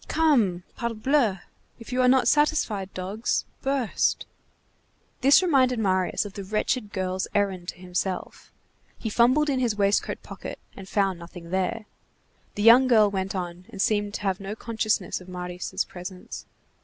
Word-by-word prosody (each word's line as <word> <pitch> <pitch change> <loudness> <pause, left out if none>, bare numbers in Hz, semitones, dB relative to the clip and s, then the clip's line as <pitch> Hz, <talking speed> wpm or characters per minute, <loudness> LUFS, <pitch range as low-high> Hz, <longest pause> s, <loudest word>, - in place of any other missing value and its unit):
Come! 235 - +2
Parbleu! 235 -3 0 0.4
if 235 +1 -9
you 255 - +2
are 250 - +4
not 260 0 +4
satisfied, 265 -11 +1
dogs, 195 +5 -2 0.2
burst!" 270 -5 0 0.9
This 275 +7 +6
reminded 260 -7 +3
Marius 185 -2 +1
of 205 - -8
the 200 - -6
wretched 215 +2 -1
girl's 185 -1 -2
errand 190 -4 0
to - - -5
himself. 180 +1 -4 0.5
He 220 - -4
fumbled 255 +7 +4
in 270 -3 +1
his 240 -4 +1
waistcoat 200 0 0
pocket, - - -8 0.2
and 190 -1 -10
found 195 -3 +1
nothing 170 0 -11
there. 190 +4 -1 0.7
The 205 - -2
young 240 +4 +8
girl 215 -4 +5
went 190 0 -3
on, 180 0 -5
and 200 - -10
seemed 205 0 +1
to - - -4
have 195 -2 -1
no 200 +2 -5
consciousness 220 -4 -1
of 180 - -13
Marius' 180 0 -4
presence. 180 0 -9
205 Hz, 155 wpm, -25 LUFS, 185-245 Hz, 0.9 s, young